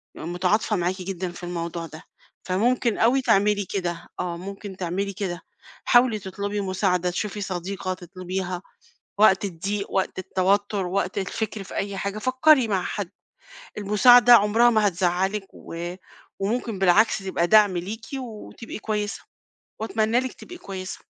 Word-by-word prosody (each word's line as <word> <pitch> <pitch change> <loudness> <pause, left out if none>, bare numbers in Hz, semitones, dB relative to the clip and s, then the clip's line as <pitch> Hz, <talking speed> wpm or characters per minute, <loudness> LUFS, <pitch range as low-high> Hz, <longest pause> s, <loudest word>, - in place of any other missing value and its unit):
متعاطفة 180 +6 0
معاكِ 185 +1 -1
جدًا 185 -1 -4
في 175 - -12
الموضوع 170 -1 -4
ده، 155 0 -11 0.4
فممكن 230 +4 +1
أوي 245 +4 +3
تعملي 205 -3 +2
كده، 175 -3 -3
آه، 175 -1 -2
ممكن 195 +1 -8
تعملي 190 +3 -2
كده 180 -3 -4 0.4
حاولي 240 -3 +4
تطلبي 200 +2 -4
مساعدة، 185 -2 0
تشوفي 205 +3 -3
صديقة 185 0 -3
تطلبيها 185 0 -5 0.6
وقت 200 -2 +5
الضيق 200 +2 -3
وقت 190 - -1
التوتر 195 +1 0
وقت 190 +1 -1
الفكر 210 +2 -3
في - - -10
أي 200 0 -3
حاجة 200 +2 -3
فكري 255 +2 +4
مع 195 -3 +1
حد، 195 -1 -4 0.7
المساعدة 240 +4 +7
عمرها 225 +2 +6
ما 215 -3 +3
هتزعلِك، 190 +2 0
و 175 +1 -6 0.4
وممكن 220 +1 -2
بالعكس 195 +4 +4
تبقى 190 -3 -1
دعم 205 -2 +5
ليكِ، 210 +6 -5
وتبقي 230 -2 -8
كويسة، 210 -1 -3 0.6
وأتمنى 220 +2 +1
لِك 260 -1 -4
تبقى 355 - -11
كويسة. 190 - -7
195 Hz, 135 wpm, -24 LUFS, 180-215 Hz, 0.7 s, المساعدة